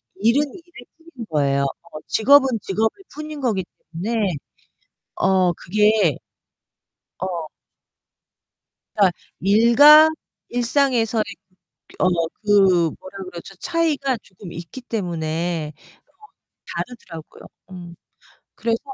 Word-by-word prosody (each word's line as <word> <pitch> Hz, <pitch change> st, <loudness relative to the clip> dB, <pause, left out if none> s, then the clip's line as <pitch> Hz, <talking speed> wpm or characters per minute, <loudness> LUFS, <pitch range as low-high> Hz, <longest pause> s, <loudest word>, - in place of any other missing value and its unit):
일은 230 Hz, +8 st, +3 dB
일일 340 Hz, -8 st, -14 dB, 0.3 s
뿐인 235 Hz, -3 st, -7 dB
거예요. 140 Hz, -2 st, +1 dB
어 155 Hz, +3 st, -6 dB
직업은 270 Hz, +4 st, +5 dB
직업일 220 Hz, -, -2 dB
뿐인 305 Hz, 0 st, -7 dB
거기 215 Hz, -8 st, 0 dB, 0.3 s
때문에 200 Hz, +2 st, -1 dB, 0.8 s
어 185 Hz, -2 st, +2 dB
그게 210 Hz, +5 st, +2 dB, 1.0 s
어. 175 Hz, -4 st, -4 dB, 1.5 s
그러니까 195 Hz, -5 st, +3 dB, 0.2 s
일과 235 Hz, -, +7 dB, 0.4 s
일상에서의 240 Hz, -2 st, +1 dB
그 185 Hz, -, -12 dB, 0.6 s
어 -, -, +5 dB, 0.4 s
그 190 Hz, -5 st, +4 dB
뭐라 185 Hz, +1 st, -11 dB
그러죠 185 Hz, +1 st, -10 dB
차이가 295 Hz, -, 0 dB
조금 185 Hz, -2 st, -12 dB
있기 170 Hz, +10 st, -9 dB
때문에 170 Hz, -7 st, -3 dB
어 -, -, -29 dB, 0.8 s
다르더라고요. 180 Hz, -10 st, -8 dB, 0.3 s
음 175 Hz, -2 st, -10 dB, 0.6 s
그래서 230 Hz, 0 st, -1 dB
205 Hz, 210 characters per minute, -21 LUFS, 175-245 Hz, 1.5 s, 일과